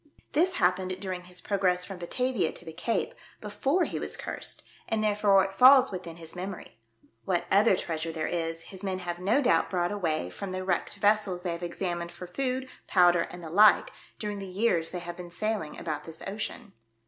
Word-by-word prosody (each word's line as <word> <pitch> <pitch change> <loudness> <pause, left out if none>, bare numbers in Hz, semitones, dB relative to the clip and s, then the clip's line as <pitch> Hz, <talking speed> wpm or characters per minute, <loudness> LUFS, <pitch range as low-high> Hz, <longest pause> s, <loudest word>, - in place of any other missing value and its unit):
This 360 +5 +3
happened 185 - +1
during 185 -2 -5
his 180 0 -8
progress 180 -1 +1
from 190 -2 -8
Batavia 240 +1 0
to - - -8
the 160 - -8
Cape, 225 +8 -1 0.3
before 265 - 0
he - - -3
was - - -3
cursed, - - -3 0.3
and 220 -1 +1
therefore 205 -2 +4
it 195 - -6
falls 260 +4 +7
within 180 -3 -6
his 165 0 -8
memory. 180 - -7 0.4
What 175 -2 0
other 200 +1 +5
treasure 165 -1 -3
there 160 -1 -3
is, 165 -1 -2
his 190 +2 -8
men 190 -2 -1
have 175 -1 -4
no 220 +10 +2
doubt 250 - +3
brought 175 -1 0
away 160 - -1
from 195 - -6
the 185 0 -3
wrecked 180 -2 -1
vessels 205 -4 +2
they 180 - -1
have 170 +1 -5
examined 175 0 -3
for 180 - -8
food, 260 +7 -2 0.2
powder 175 -2 +4
and 180 -1 -10
the 160 - -7
like, 210 +4 +6 0.3
during 210 -1 -4
the 195 - -6
years 185 -4 +1
they 180 - -5
have 175 0 -7
been 180 -1 -8
sailing; 205 -3 -2
about 155 0 -4
this 160 -1 -9
ocean." 205 0 -5
185 Hz, 195 wpm, -28 LUFS, 175-210 Hz, 0.4 s, falls